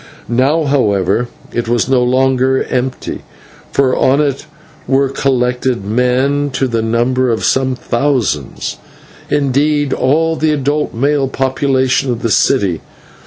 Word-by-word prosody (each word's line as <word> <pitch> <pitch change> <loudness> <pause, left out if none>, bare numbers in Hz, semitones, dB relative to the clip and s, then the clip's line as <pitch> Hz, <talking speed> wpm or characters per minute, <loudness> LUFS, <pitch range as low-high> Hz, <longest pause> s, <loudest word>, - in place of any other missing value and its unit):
Now, 135 +7 +2
however, 120 - +1 0.3
it 120 -1 -2
was 120 0 +1
no 130 -1 +2
longer 130 +1 +2
empty, 130 0 -3 0.5
for 130 -2 +2
on 135 +2 +2
it 145 0 -1 0.4
were 135 0 +2
collected 125 -4 -1
men 125 +6 +1
to 135 - 0
the 115 -2 -1
number 120 +3 +1
of 115 -2 -1
some 130 -1 +1
thousands; 120 - -2 0.5
indeed, 145 0 +1
all 160 +5 +1
the 155 0 +1
adult 145 0 -1
male 140 +3 +1
population 130 0 0
of 120 +1 -4
the 115 - 0
city. 100 -12 +2
130 Hz, 125 wpm, -15 LUFS, 125-140 Hz, 0.5 s, Now